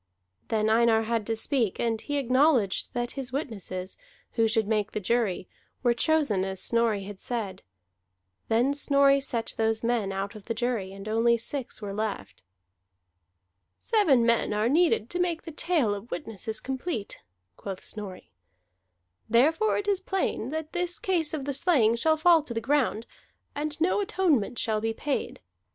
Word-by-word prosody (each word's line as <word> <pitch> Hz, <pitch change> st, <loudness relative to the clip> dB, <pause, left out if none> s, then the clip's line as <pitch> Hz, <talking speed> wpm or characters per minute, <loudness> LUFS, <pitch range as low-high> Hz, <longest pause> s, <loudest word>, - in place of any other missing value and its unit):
Then 215 Hz, -1 st, +1 dB
Einar 225 Hz, 0 st, +4 dB
had 225 Hz, -1 st, -1 dB
to 225 Hz, -, 0 dB
speak; 225 Hz, -2 st, 0 dB
and 225 Hz, -2 st, 0 dB
he 290 Hz, -1 st, -2 dB
acknowledged 255 Hz, -5 st, +2 dB
that 240 Hz, 0 st, -1 dB
his 265 Hz, -3 st, -5 dB
witnesses, 200 Hz, -9 st, -5 dB, 0.3 s
who 225 Hz, -1 st, +2 dB
should 220 Hz, -1 st, +1 dB
make 210 Hz, -2 st, 0 dB
the -, -, -1 dB
jury, 210 Hz, -3 st, 0 dB, 0.4 s
were 240 Hz, -1 st, +4 dB
chosen 260 Hz, -, +1 dB
as 190 Hz, -1 st, -3 dB
Snorri 230 Hz, -3 st, +1 dB
had 200 Hz, 0 st, -9 dB
said. 225 Hz, -6 st, -4 dB, 0.9 s
Then 240 Hz, +5 st, +2 dB
Snorri 280 Hz, -1 st, +4 dB
set 235 Hz, -4 st, -2 dB
those 225 Hz, 0 st, 0 dB
men 230 Hz, -4 st, 0 dB
out 195 Hz, +2 st, -3 dB
of 215 Hz, -3 st, -11 dB
the 230 Hz, -, -3 dB
jury, 230 Hz, -5 st, -1 dB
and 195 Hz, +1 st, -9 dB
only 230 Hz, +2 st, +3 dB
six 240 Hz, -1 st, -5 dB
were 200 Hz, -1 st, -4 dB
left. 205 Hz, -, -4 dB, 1.4 s
"Seven 315 Hz, -, +3 dB
men 230 Hz, -2 st, +2 dB
are 210 Hz, +2 st, +1 dB
needed 320 Hz, -7 st, +3 dB
to 355 Hz, -, -2 dB
make 345 Hz, -2 st, 0 dB
the 330 Hz, -, -7 dB
tale 300 Hz, -8 st, +1 dB
of 205 Hz, +3 st, -7 dB
the -, -, -2 dB
witnesses 220 Hz, -, -5 dB
complete," 265 Hz, -, -4 dB, 0.3 s
quoth 195 Hz, -, -7 dB
Snorri. 205 Hz, -4 st, -7 dB, 1.0 s
"Therefore 310 Hz, -, +3 dB
it 405 Hz, -, -3 dB
is 400 Hz, -2 st, +2 dB
plain 380 Hz, -, -2 dB
that 315 Hz, +1 st, -5 dB
this 355 Hz, 0 st, -1 dB
case 345 Hz, -5 st, 0 dB
of 295 Hz, -4 st, -4 dB
the 280 Hz, -, -2 dB
slaying 265 Hz, -7 st, +3 dB
shall 315 Hz, +7 st, +2 dB
fall 330 Hz, +1 st, +5 dB
to 255 Hz, -6 st, -7 dB
the -, -, +1 dB
ground, 255 Hz, -4 st, 0 dB, 0.5 s
and 300 Hz, +1 st, -4 dB
no 365 Hz, +5 st, +2 dB
atonement 345 Hz, -, +1 dB
shall 215 Hz, -1 st, 0 dB
be 225 Hz, 0 st, -1 dB
paid. 290 Hz, -2 st, -3 dB
235 Hz, 165 wpm, -27 LUFS, 215-295 Hz, 1.4 s, fall